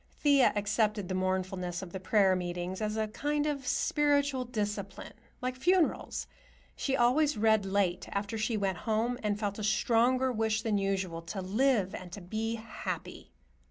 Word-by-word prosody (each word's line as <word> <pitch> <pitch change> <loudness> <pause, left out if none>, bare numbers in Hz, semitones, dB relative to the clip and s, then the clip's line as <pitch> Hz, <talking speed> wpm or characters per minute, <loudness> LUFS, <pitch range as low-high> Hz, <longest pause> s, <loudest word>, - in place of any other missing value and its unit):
Thea 285 -4 +5
accepted 210 -1 0
the - - -1
mournfulness 185 -1 -2
of 180 - -9
the 190 - -5
prayer 190 0 +3
meetings 180 +2 -4
as 215 0 -1
a 220 0 0
kind 295 +7 -1
of 280 -4 -2
spiritual 285 -3 +1
discipline, 205 -4 -4 0.3
like 255 0 -1
funerals. 350 +5 +1 0.5
She 270 - -1
always 265 +3 +3
read 220 -2 +3
late 190 -2 0
after 200 +2 -2
she 220 +1 0
went 190 -3 -1
home 235 +3 +1
and 210 -1 -1
felt 205 -1 -2
a - - -4
stronger 235 +5 +2
wish 220 -2 0
than 215 -3 +1
usual 190 -4 -1
to 190 +4 -6
live 210 -1 +2
and 180 -1 -7
to 205 - -6
be 220 +5 -2
happy. 225 0 -6
215 Hz, 160 wpm, -30 LUFS, 190-245 Hz, 0.5 s, Thea